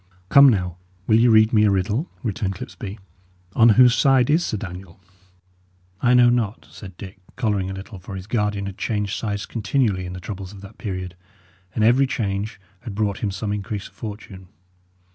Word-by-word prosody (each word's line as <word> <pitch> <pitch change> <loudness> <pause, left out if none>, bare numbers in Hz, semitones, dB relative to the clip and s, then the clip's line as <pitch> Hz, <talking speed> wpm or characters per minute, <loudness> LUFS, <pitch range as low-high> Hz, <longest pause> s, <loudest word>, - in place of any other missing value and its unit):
"Come, 140 0 +8
now, 90 -6 -1 0.3
will 110 +2 +4
ye 120 - +5
read 110 0 +5
me 105 -1 +5
a - - +4
riddle?" 105 - 0
returned 105 -4 -2
Clipsby. 100 +2 -8 0.6
"On 115 0 +6
whose 125 -1 +7
side 135 0 +3
is 165 +3 +3
Sir 110 - -2
Daniel?" 90 -1 -9 1.0
"I 125 0 +4
know 120 -1 +6
not," 115 -3 -1
said 95 -4 -11
Dick, 95 0 -10 0.2
colouring 105 -6 -1
a - - -4
little; 95 +1 -9
for 95 +2 -9
his 95 -1 -7
guardian 105 -2 -1
had 100 -1 -7
changed 105 -3 -2
sides 100 -2 -3
continually 105 -4 -1
in 90 - -7
the 90 - -7
troubles 95 0 -7
of 100 - -12
that 100 +2 -13
period, 90 -5 -5 0.6
and 110 - +1
every 125 +5 +4
change 105 -2 -3 0.2
had 115 -5 -8
brought 105 -2 -1
him 105 - -1
some 100 +2 -3
increase 105 0 -5
of - - -31
fortune. 100 -3 -9
105 Hz, 185 wpm, -22 LUFS, 95-115 Hz, 1.0 s, Come